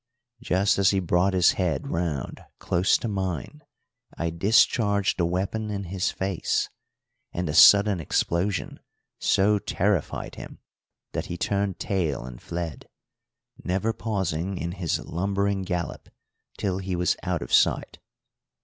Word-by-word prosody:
Just 100 -4 +2
as 95 -1 +5
he 95 - +2
brought 90 +2 +1
his 90 -1 +5
head 85 -7 -1
round 85 -6 -3
close 90 +3 +2
to - - -4
mine, 95 - -3 0.6
I 85 0 -1
discharged 100 +2 +2
the 85 - +2
weapon 100 +5 -2
in 100 -1 -3
his 95 -1 0
face, 95 -2 -1 0.6
and 90 -1 -3
the 75 - -2
sudden 100 +4 +7
explosion 85 +4 -1 0.4
so 105 +1 +3
terrified 100 -3 -1
him - - -10 0.5
that - - -3
he 85 - -5
turned 100 0 -1
tail 80 -11 -1
and - - -10
fled, 85 -3 -6 0.7
never 95 +5 0
pausing 95 -5 -2
in 85 0 -3
his 90 -3 -1
lumbering 100 +3 -1
gallop 90 -2 -4 0.5
till 95 -2 -1
he 95 -1 -3
was 90 +1 +1
out - - -2
of - - -8
sight. - - +2
95 Hz, 135 wpm, -25 LUFS, 85-100 Hz, 0.7 s, sudden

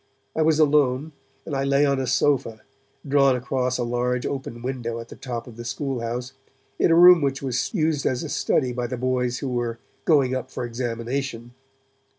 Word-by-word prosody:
I 160 - +1
was 155 -1 +3
alone, 150 -1 +2 0.3
and 145 - -4
I 135 - 0
lay 140 +1 +3
on 140 -1 +1
a 130 - -2
sofa, 125 -4 +1 0.5
drawn 140 -1 +4
across 125 0 -1
a 125 - -1
large 120 +1 -1
open 125 -4 -5
window 120 -3 -3
at 115 - -9
the - - -10
top 120 -3 -5
of 120 -2 -12
the 120 - -7
school 135 +2 -3
house, 120 +2 -4 0.5
in - - +4
a 165 - +5
room 175 0 +8
which 135 -1 -1
was 130 -2 -1
used 155 -6 0
as 125 -1 -1
a - - -5
study 125 -3 0
by 120 0 -2
the 125 +1 -4
boys 125 0 0
who - - -2
were 120 -2 -2 0.3
'going 140 -6 +4
up 130 0 -3
for 125 - -4
examination'. 120 +1 -4
130 Hz, 195 wpm, -24 LUFS, 120-140 Hz, 0.5 s, room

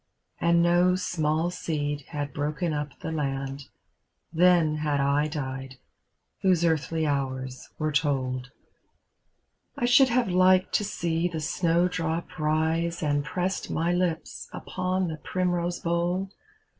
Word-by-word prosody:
And 170 0 +4
no 175 +1 +4
small 160 -2 0
seed 145 -5 -3
had 145 -2 -4
broken 150 +3 -1
up 150 -1 -4
the - - -4
land, 135 -2 -3 0.7
Then 170 -2 +4
had 150 -2 0
I 140 +2 +2
died, 135 -3 -5 0.7
whose 180 -3 +3
earthly 160 0 +1
hours 130 -3 -3
were 155 0 -1
told. 130 -4 0 1.3
I 240 - 0
should 255 +2 +6
have 245 0 +2
liked 185 +1 +4
to - - +2
see 170 -4 -1
the 165 -2 -4
snowdrop 165 +1 0
rise, 160 +2 0
And 145 -1 +1
pressed 180 +5 -2
my 170 +2 0
Ups 175 -2 -2
upon 185 0 -2
the 160 -2 -4
primrose 175 0 -1
bowl. 175 +3 -1
160 Hz, 125 wpm, -27 LUFS, 145-175 Hz, 1.3 s, should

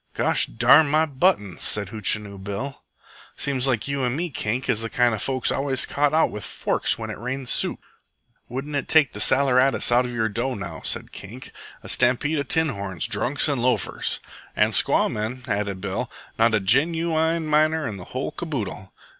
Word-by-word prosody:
"Gosh - - +3
darn 155 +1 +5
my 155 +2 +3
buttoms!" 135 - 0
said 100 -3 +1
Hootchinoo 105 -1 -1
Bill. 100 +8 -5 0.5
"Seems 135 -2 0
likes 120 -3 0
you 140 -1 -2
and 125 +2 -1
me, 175 0 -3
Kink, 120 +1 -3
is 120 -4 +1
the 115 - -3
kind 120 -1 +2
of 110 - -3
folks 130 -2 0
always 135 -2 0
caught 145 0 +1
out 160 +1 +2
with 105 - -7
forks - - -1
when - - -5
it - - -8
rains 125 +2 -4
soup." - - 0 0.7
"Wouldn't 135 +4 -5
it 140 - -2
take 155 -5 +4
the 105 - -7
saleratus 130 -1 +3
out 125 +1 +4
your 115 -2 -1
dough, 120 +4 -2
now?" 85 -7 -7
said - - -1
Kink 100 +2 -10
Mitchell. - - -15 0.2
"A - - -9
stampede 130 +5 +1
of 140 - -3
tin 160 -1 +2
horns, 100 - -4
drunks, 135 +4 0
an' 140 -4 0
loafers." 125 0 0 0.4
"An' - - +3
squaw - - +3
men," 115 +4 -4
added 100 -2 -2
Bill. 100 -1 -3 0.3
"Not 115 -1 +4
a - - +2
genooine 160 - +2
miner 155 0 +2
in 105 -3 -5
the 90 - -10
whole 130 +1 -4
caboodle." 115 - -5
125 Hz, 190 wpm, -23 LUFS, 105-145 Hz, 0.7 s, darn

